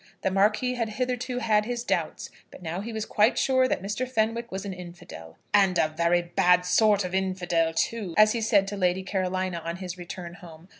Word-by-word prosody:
The 190 - +1
Marquis 210 +6 +2
had 230 -3 -2
hitherto 250 +2 -3
had 215 -3 +2
his 240 0 -3
doubts, - - -2 0.2
but - - -14
now 170 +3 -4
he 230 +3 -6
was 220 -1 -3
quite 215 +4 +2
sure 260 -1 +3
that 190 - -2
Mr. 210 +6 -3
Fenwick 230 0 -1
was 190 +1 -5
an 195 - -4
infidel. 175 - -11 0.2
"And 195 -3 +4
a 155 -1 +1
very 170 +1 +2
bad 180 0 +3
sort 205 +1 +3
of 180 - -6
infidel, 180 -3 0
too," 200 -3 -2
as 215 0 +7
he 230 - -2
said 205 -3 +3
to 205 - -5
Lady 185 0 +1
Carolina 185 -2 -2
on 170 +1 -4
his 185 -1 -7
return 175 0 -7
home. 175 -1 -14
190 Hz, 205 wpm, -26 LUFS, 175-220 Hz, 0.2 s, as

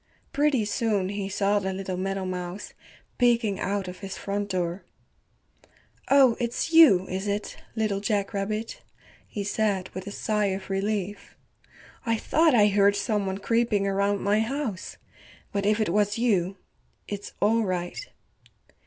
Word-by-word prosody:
Pretty 280 -6 +2
soon 205 -3 0
he 200 -1 -3
saw 200 +1 +1
the 190 -1 -2
little 190 -1 -4
meadowmouse 185 0 -4 0.5
peeking 235 -5 +2
out 200 -1 -2
of 180 0 -8
his 195 -1 -6
front 205 +1 -3
door. 180 0 -2 1.3
"Oh, 270 -4 +6
it's 240 +7 -2
you, 230 - +7
is 190 +2 -3
it, 205 +1 -3 0.2
Little 215 -3 0
Jack 205 -1 -1
Rabbit," 215 +3 -3 0.5
he 205 - -4
said 200 -2 0
with 185 +1 -8
a - - -4
sigh 210 0 0
of 190 0 -4
relief, 200 0 -3 0.7
"I 230 -2 +1
thought 315 +4 +3
I 210 -3 +6
heard 200 0 +4
some 205 -1 -1
one 190 0 -2
creeping 230 -1 +1
around 200 +1 +1
my 205 +2 +2
house. 225 -4 -3 0.5
But 200 0 -1
if 210 +1 +2
it 215 - +1
was 205 +3 +1
you, 195 -5 +1 0.5
it's 205 -1 -6
all 225 +3 +3
right." 180 -3 -3
205 Hz, 145 wpm, -26 LUFS, 195-220 Hz, 1.3 s, you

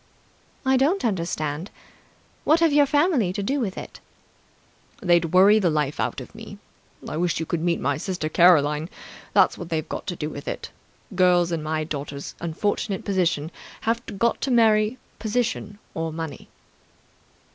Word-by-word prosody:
"I 265 0 +4
don't 295 +6 +2
understand. 170 -4 -2 0.7
What 315 +2 +4
have 330 -3 +3
your 290 -1 +5
family 290 - +2
got 180 - -4
to 200 - -2
do 275 +8 0
with 200 -7 -3
it?" - - -8 1.0
"They'd 175 -2 +3
worry 190 +6 +6
the 185 -4 +2
life 150 -2 -1
out - - -1
of - - -10
me. - - -10 0.5
I 150 - -4
wish 175 -1 0
you 165 - -2
could 165 0 -2
meet 170 0 +1
my 140 0 0
sister 180 -1 -3
Caroline! 155 -2 +4 0.4
That's - - +4
what 175 - -7
they've 160 -2 -2
got - - -6
to 175 - -2
do 150 -1 -4
with 145 0 -8
it. - - -5 0.4
Girls 180 -2 +3
in 165 -2 -1
my 155 0 -1
daughter's 145 -2 -6
unfortunate 190 +4 -2
position 170 -5 0 0.3
have 230 +1 0 0.2
got 235 +3 +1
to 270 - -1
marry 220 -1 +3 0.2
position 220 -1 -2 0.2
or 165 0 -3
money." 160 -3 -7
180 Hz, 165 wpm, -24 LUFS, 160-220 Hz, 1.0 s, worry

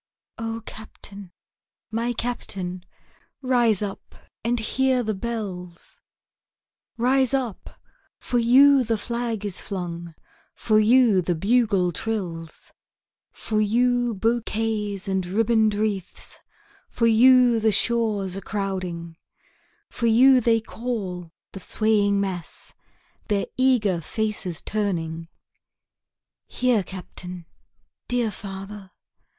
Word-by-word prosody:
O 225 0 -4
Captain! 200 -3 -10 0.6
my 230 +2 -1
Captain! 190 -6 -4 0.6
rise 240 -5 +2
up 200 -1 -7 0.3
and 240 +1 +1
hear 255 +3 +1
the 215 -1 -1
bells; 190 -5 -6 1.0
Rise 260 +2 +2
up 245 -7 -4 0.4
for 245 - 0
you 265 +3 +6
the 225 -1 0
flag 235 -2 -3
is 200 -3 -4
flung 170 -3 -6 0.4
for 215 -1 +2
you 225 -3 +5
the 175 0 -1
bugle 200 -1 +2
trills, 170 -6 -5 0.6
For 215 -1 -2
you 240 +2 +2
bouquets 215 -2 -1
and 190 -1 0
ribbon'd 220 +3 +2
wreaths 205 -3 -3 0.5
for 230 - 0
you 245 +1 +6
the 220 0 +3
shores 210 -4 0
a 195 - -5
crowding, 185 -5 -4 0.7
For 235 - -1
you 255 +3 +6
they 225 -1 +3
call, 205 -7 -5 0.2
the 195 - -8
swaying 205 0 +1
mass, 185 -4 -5 0.5
their 205 -2 0
eager 230 -9 +2
faces 205 -2 -3
turning; 165 -6 -2 1.2
Here 250 -4 +1
Captain! 180 -1 -8 0.6
dear 240 -3 0
father! 195 0 -8
215 Hz, 100 wpm, -24 LUFS, 190-235 Hz, 1.2 s, you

